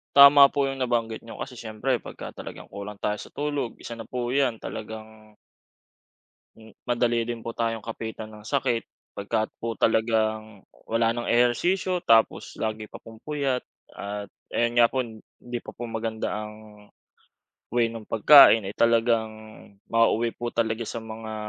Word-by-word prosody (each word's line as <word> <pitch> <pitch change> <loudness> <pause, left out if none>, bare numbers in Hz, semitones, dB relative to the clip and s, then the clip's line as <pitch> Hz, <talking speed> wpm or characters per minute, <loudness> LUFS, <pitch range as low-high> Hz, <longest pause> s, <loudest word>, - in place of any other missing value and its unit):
Tama 140 0 +10
po 140 -1 +1
yung 135 - -5
nabanggit 120 -3 -1
niyo 115 - -9
kasi 125 - -7
siyempre 115 +3 -2
pagka - - -9
talagang - - -9
kulang 100 0 -8
tayo 105 0 0
sa - - -11
tulog, 145 -5 -2
isa 115 -1 -7
na 115 - -8
po 120 -1 -3
yan 130 -4 +1
talagang 110 0 -8 1.2
hmm, 110 0 -16
madali 120 -1 +1
din 115 -1 -5
po 115 - -5
tayong 115 -1 -2
kapitan 110 -1 -6
ng 105 0 -13
sakit, 125 -2 0 0.3
pagka 105 +2 -1
po 115 0 -3
talagang, 110 -2 +1 0.2
wala 115 0 +1
ng 120 0 -4
ehersisyo 175 +10 +2
tapos 115 0 +3
lagi 110 -1 -2
pa - - -9
pong 115 0 -13
puyat, 140 -4 -1 0.3
at 100 0 -6 0.2
ayun 120 0 +1
nga 120 - +8
po, 130 - 0
hindi 120 +1 -8
pa - - -9
po 120 - -6
maganda 110 -1 -3 0.2
ang, 105 - -9 1.2
way 115 -1 +1
ng 115 -2 -9
pagkain, 115 -2 +8
eh, 100 - -4
talagang 115 -1 +2 0.6
mauuwi 115 0 +3
po 120 - -5
talaga 115 0 -1
sa 115 - -5
mga 110 0 -7
115 Hz, 155 wpm, -26 LUFS, 110-120 Hz, 1.2 s, Tama